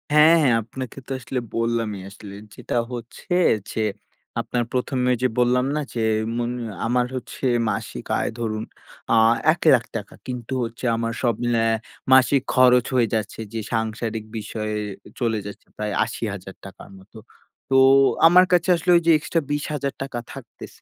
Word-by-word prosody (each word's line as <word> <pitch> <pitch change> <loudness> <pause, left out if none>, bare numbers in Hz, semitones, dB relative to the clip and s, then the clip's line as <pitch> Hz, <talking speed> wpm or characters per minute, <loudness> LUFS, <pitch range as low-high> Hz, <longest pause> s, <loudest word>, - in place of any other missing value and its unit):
হ্যাঁ, 155 +2 +7
হ্যাঁ। 125 -4 +4
আপনাকে 130 +4 -8
তো - - -9
আসলে 125 +1 -3 0.2
বললামই। 115 -3 -1
আসলে 100 0 -11 0.2
যেটা - - -5 0.2
হচ্ছে 120 - -6 0.4
যে - - -4 0.6
আপনার 120 -1 -2
১ম 125 +1 -1
এ - - +4
যে - - +5
বললাম 125 +1 +3
না 150 - 0
যে 115 - -2 0.4
মুন 120 0 -1 0.4
আমার 125 +1 +2
হচ্ছে 130 +1 -6 0.2
মাসিক 100 - -4
আয় - - -1
ধরুন 110 -2 -2 0.5
আ - - +5 0.4
৳১,০০,০০০ 145 -8 +4
টাকা। 105 -3 -8
কিন্তু 125 0 -5
হচ্ছে 115 +2 -6
আমার 115 0 -2
সব 120 -2 +2
মিলায়া 115 -1 +2 0.4
মাসিক 130 +1 +5
খরচ 125 -1 +5
হয়ে 120 -2 +3
যাচ্ছে 110 0 -3
যে 115 - -2
সাংসারিক 110 0 -2
বিষয়ে 110 0 -4 0.4
চলে 115 -3 0
যাচ্ছে 105 - -10
প্রায় 105 -1 -3
৳৮০,০০০ 100 -4 -7
র - - -17
মতো। 105 +4 -17 0.5
তো 135 - +2 0.5
আমার 180 +2 +7
কাছে 180 +1 +3
আসলে 170 +2 0
ওই 170 - +1
যে 165 - +7
extra 165 +2 -1
৳২০,০০০ 140 -3 -3
থাকতেছে। - - -12
120 Hz, 155 wpm, -23 LUFS, 110-130 Hz, 0.6 s, হ্যাঁ